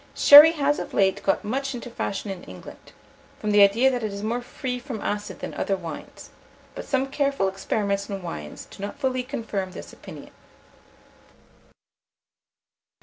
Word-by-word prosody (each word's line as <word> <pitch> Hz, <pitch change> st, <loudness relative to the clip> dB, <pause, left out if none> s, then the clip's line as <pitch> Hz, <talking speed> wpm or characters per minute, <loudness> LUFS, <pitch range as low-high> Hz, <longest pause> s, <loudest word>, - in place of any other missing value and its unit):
Sherry 295 Hz, +3 st, +9 dB
has 290 Hz, -2 st, 0 dB
of -, -, -7 dB
late 190 Hz, -1 st, +2 dB
got 195 Hz, -, 0 dB
much 270 Hz, +4 st, -2 dB
into 245 Hz, 0 st, -8 dB
fashion 200 Hz, -2 st, -4 dB
in 185 Hz, -2 st, -8 dB
England, -, -, -12 dB, 0.5 s
from 215 Hz, -, -2 dB
the 205 Hz, 0 st, +5 dB
idea 225 Hz, +7 st, +5 dB
that 250 Hz, -1 st, -2 dB
it 215 Hz, -2 st, -3 dB
is 200 Hz, +1 st, -7 dB
more 235 Hz, +3 st, -2 dB
free 250 Hz, 0 st, -5 dB
from 245 Hz, -3 st, -7 dB
acid 205 Hz, +1 st, -4 dB
than -, -, -5 dB
other 195 Hz, -, -1 dB
wines; 165 Hz, -4 st, -9 dB, 0.4 s
but -, -, -8 dB
some 265 Hz, -1 st, 0 dB
careful 275 Hz, -6 st, 0 dB
experiments 200 Hz, +1 st, -2 dB
on 195 Hz, -2 st, -5 dB
wines 75 Hz, -, -7 dB
do -, -, -14 dB
not 205 Hz, +8 st, -6 dB
fully 260 Hz, -2 st, -1 dB
confirm 220 Hz, -8 st, -5 dB
this -, -, -10 dB
opinion. -, -, -12 dB
220 Hz, 160 wpm, -24 LUFS, 200-265 Hz, 0.5 s, Sherry